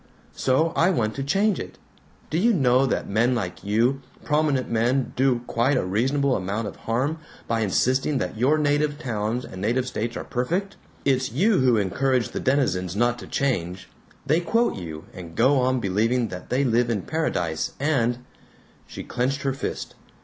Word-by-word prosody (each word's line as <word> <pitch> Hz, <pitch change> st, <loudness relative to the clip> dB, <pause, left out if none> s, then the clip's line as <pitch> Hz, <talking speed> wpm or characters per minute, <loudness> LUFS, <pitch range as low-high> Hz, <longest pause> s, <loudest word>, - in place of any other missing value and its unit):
So 155 Hz, +6 st, +1 dB
I 175 Hz, -, +4 dB
want 115 Hz, -, 0 dB
to 135 Hz, -, -4 dB
change 195 Hz, +8 st, +1 dB
it. -, -, -7 dB, 0.5 s
Do 160 Hz, -, +1 dB
you 230 Hz, +5 st, +4 dB
know 135 Hz, -5 st, +3 dB
that -, -, -1 dB
men 115 Hz, +5 st, +2 dB
like 90 Hz, -7 st, -4 dB
you, 115 Hz, +7 st, +1 dB, 0.2 s
prominent 150 Hz, -4 st, +1 dB
men, 120 Hz, +3 st, 0 dB
do 125 Hz, -2 st, +2 dB
quite 130 Hz, +5 st, +1 dB
a 125 Hz, -, 0 dB
reasonable 130 Hz, +8 st, +1 dB
amount 100 Hz, +4 st, -2 dB
of -, -, -7 dB
harm 135 Hz, +8 st, -1 dB, 0.3 s
by 115 Hz, 0 st, 0 dB
insisting 130 Hz, +7 st, +1 dB
that -, -, -3 dB
your 130 Hz, +7 st, +3 dB
native 145 Hz, 0 st, +1 dB
towns 115 Hz, -3 st, -2 dB
and 95 Hz, -, -9 dB
native 120 Hz, +5 st, +1 dB
states 115 Hz, -1 st, -3 dB
are -, -, -4 dB
perfect? 175 Hz, +11 st, -2 dB, 0.3 s
It's 130 Hz, -3 st, +1 dB
you 190 Hz, -, +3 dB
who 125 Hz, -3 st, +4 dB
encourage 125 Hz, +5 st, +1 dB
the -, -, -4 dB
denizens 95 Hz, -10 st, 0 dB
not 120 Hz, +2 st, +1 dB
to -, -, -9 dB
change. 95 Hz, -10 st, -2 dB, 0.4 s
They 155 Hz, +4 st, +3 dB
quote 230 Hz, +7 st, +1 dB
you, 80 Hz, -4 st, -7 dB
and 85 Hz, -3 st, -10 dB
go 130 Hz, -, +4 dB
on 130 Hz, 0 st, +2 dB
believing 115 Hz, +4 st, +1 dB
that 90 Hz, -1 st, -8 dB
they 130 Hz, +3 st, +1 dB
live 120 Hz, -1 st, +2 dB
in 105 Hz, -5 st, -1 dB
paradise, 90 Hz, -, -2 dB
and 125 Hz, -4 st, 0 dB, 0.3 s
" -, -, -31 dB
She -, -, -8 dB
clenched 130 Hz, +3 st, -2 dB
her 135 Hz, -1 st, 0 dB
fist. 135 Hz, -, -5 dB
125 Hz, 180 wpm, -24 LUFS, 110-140 Hz, 0.5 s, I